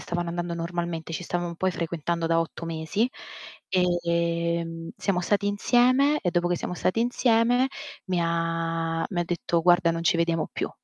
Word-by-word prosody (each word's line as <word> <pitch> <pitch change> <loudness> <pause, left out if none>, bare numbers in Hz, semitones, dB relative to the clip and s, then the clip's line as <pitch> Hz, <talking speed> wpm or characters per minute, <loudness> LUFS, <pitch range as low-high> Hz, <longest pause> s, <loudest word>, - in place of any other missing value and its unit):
stavano 175 0 -3
andando 175 0 -3
normalmente, 170 -1 -4
ci 170 - -3
stavamo 175 -1 -3
poi 185 +2 0
frequentando 170 0 -2
da 165 0 +3
8 165 0 -5
mesi; 165 +8 -1 0.6
e, 170 -2 +1
mhmm, 165 0 -7
siamo 190 -3 0
stati 200 +3 +1
insieme 255 +8 +3
e 180 - 0
dopo 175 0 +1
che 175 - +1
siamo 180 - -4
stati 185 +4 0
insieme 245 +1 +3 0.4
mi 180 -1 0
ha 165 0 -1
mi 175 -3 -2
ha - - 0
detto: 170 -1 -1
"Guarda, 175 -1 +4
non 165 0 -3
ci 170 - +3
vediamo 170 -1 0
più". - - -3
170 Hz, 170 wpm, -26 LUFS, 165-185 Hz, 0.6 s, Guarda